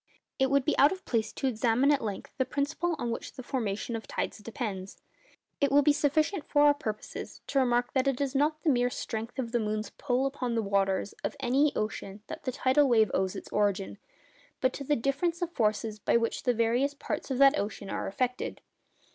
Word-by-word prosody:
It 265 Hz, 0 st, +3 dB
would 280 Hz, -1 st, +2 dB
be 305 Hz, -, +2 dB
out 285 Hz, +2 st, +7 dB
of 380 Hz, 0 st, -6 dB
place 225 Hz, -3 st, 0 dB
to -, -, -4 dB
examine 245 Hz, +2 st, +3 dB
at 285 Hz, -2 st, +2 dB
length 205 Hz, -3 st, -5 dB
the -, -, +4 dB
principle 300 Hz, +6 st, -1 dB
on 235 Hz, -, -2 dB
which 230 Hz, -, -5 dB
the 255 Hz, -, -8 dB
formation 230 Hz, -2 st, -2 dB
of 225 Hz, -, -6 dB
tides -, -, -3 dB
depends. 210 Hz, -4 st, -5 dB, 0.6 s
It 280 Hz, -3 st, +2 dB
will 285 Hz, +1 st, +6 dB
be 295 Hz, -, +5 dB
sufficient 305 Hz, +4 st, +1 dB
for 290 Hz, -1 st, +3 dB
our 290 Hz, 0 st, +7 dB
purposes 220 Hz, -7 st, -6 dB
to 275 Hz, -, +1 dB
remark 245 Hz, -1 st, +1 dB
that 265 Hz, 0 st, +2 dB
it 270 Hz, -2 st, +1 dB
is 280 Hz, -2 st, -1 dB
not 300 Hz, +3 st, +2 dB
to -, -, -39 dB
the 315 Hz, -, +4 dB
mere 245 Hz, -1 st, +2 dB
strength 230 Hz, 0 st, -5 dB
of 240 Hz, -3 st, -3 dB
the 240 Hz, -, +1 dB
moon's 215 Hz, 0 st, -2 dB
'pull' 250 Hz, +2 st, 0 dB
upon 255 Hz, -3 st, -2 dB
the 225 Hz, -, +1 dB
waters 195 Hz, 0 st, 0 dB
of -, -, -2 dB
any 275 Hz, +4 st, +3 dB
ocean 210 Hz, -1 st, -4 dB
that -, -, -8 dB
the 255 Hz, -, 0 dB
tidal 265 Hz, +2 st, +3 dB
wave 220 Hz, -4 st, +4 dB
owes 190 Hz, +1 st, 0 dB
its -, -, -7 dB
origin, 200 Hz, -1 st, 0 dB, 0.6 s
but 255 Hz, -1 st, +1 dB
to 280 Hz, -, -5 dB
the 295 Hz, +2 st, +2 dB
difference 285 Hz, +8 st, 0 dB
of 345 Hz, -, -1 dB
the -, -, -33 dB
forces 215 Hz, -1 st, 0 dB
by 220 Hz, -, +3 dB
which 230 Hz, 0 st, -1 dB
the 245 Hz, -, +2 dB
various 240 Hz, +5 st, +1 dB
parts 295 Hz, +1 st, -4 dB
of 265 Hz, -, -1 dB
that 275 Hz, +2 st, +6 dB
ocean 200 Hz, -1 st, -4 dB
are -, -, -2 dB
attracted. 250 Hz, +5 st, -2 dB
250 Hz, 220 wpm, -29 LUFS, 220-280 Hz, 0.6 s, out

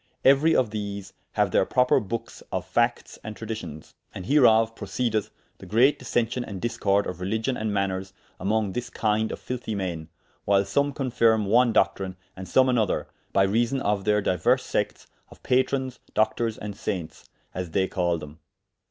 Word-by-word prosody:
Euery 140 Hz, +4 st, +5 dB
of 120 Hz, -5 st, +2 dB
these 100 Hz, -2 st, -5 dB, 0.2 s
haue -, -, +4 dB
their -, -, +2 dB
proper 125 Hz, 0 st, +3 dB
bookes 115 Hz, +3 st, -6 dB
of 90 Hz, -1 st, -2 dB
factes 120 Hz, +6 st, 0 dB
and 110 Hz, -1 st, -6 dB
traditions. 105 Hz, -9 st, -7 dB, 0.2 s
And 90 Hz, -, -6 dB
hereof 115 Hz, -4 st, +4 dB
proceedeth 115 Hz, -5 st, -2 dB, 0.3 s
the -, -, -11 dB
great 125 Hz, +7 st, +4 dB
dissention 120 Hz, 0 st, -1 dB
and 100 Hz, -5 st, -7 dB
discorde 100 Hz, -2 st, +1 dB
of 90 Hz, 0 st, -6 dB
religion 110 Hz, +7 st, -1 dB
and 110 Hz, -2 st, -2 dB
maners 95 Hz, -1 st, -1 dB, 0.3 s
among 105 Hz, +1 st, 0 dB
this 120 Hz, +3 st, -4 dB
kynde 110 Hz, 0 st, 0 dB
of -, -, -5 dB
filthie 125 Hz, -3 st, -4 dB
men, 85 Hz, -5 st, -4 dB, 0.3 s
whyle 100 Hz, 0 st, +3 dB
some 140 Hz, +8 st, +1 dB
confirm 115 Hz, -5 st, +2 dB
one 120 Hz, +4 st, +4 dB
doctrine, 95 Hz, -3 st, +1 dB, 0.2 s
and 95 Hz, 0 st, -8 dB
some 130 Hz, +9 st, +4 dB
another, 120 Hz, -5 st, +1 dB, 0.2 s
by 95 Hz, -, +4 dB
reason 115 Hz, +7 st, +1 dB
of 105 Hz, -4 st, 0 dB
theyr 105 Hz, -1 st, +2 dB
dyuers 90 Hz, -4 st, +2 dB
sectes -, -, -2 dB, 0.2 s
of -, -, -17 dB
Patrons, 130 Hz, 0 st, 0 dB, 0.2 s
Doctours, 110 Hz, +1 st, +1 dB
and 105 Hz, -1 st, -6 dB
Saintes, 95 Hz, -7 st, -5 dB, 0.3 s
as 90 Hz, -1 st, -4 dB
they 95 Hz, +3 st, +1 dB
call 85 Hz, -2 st, 0 dB
them. 75 Hz, 0 st, -10 dB
110 Hz, 165 wpm, -25 LUFS, 95-120 Hz, 0.3 s, Euery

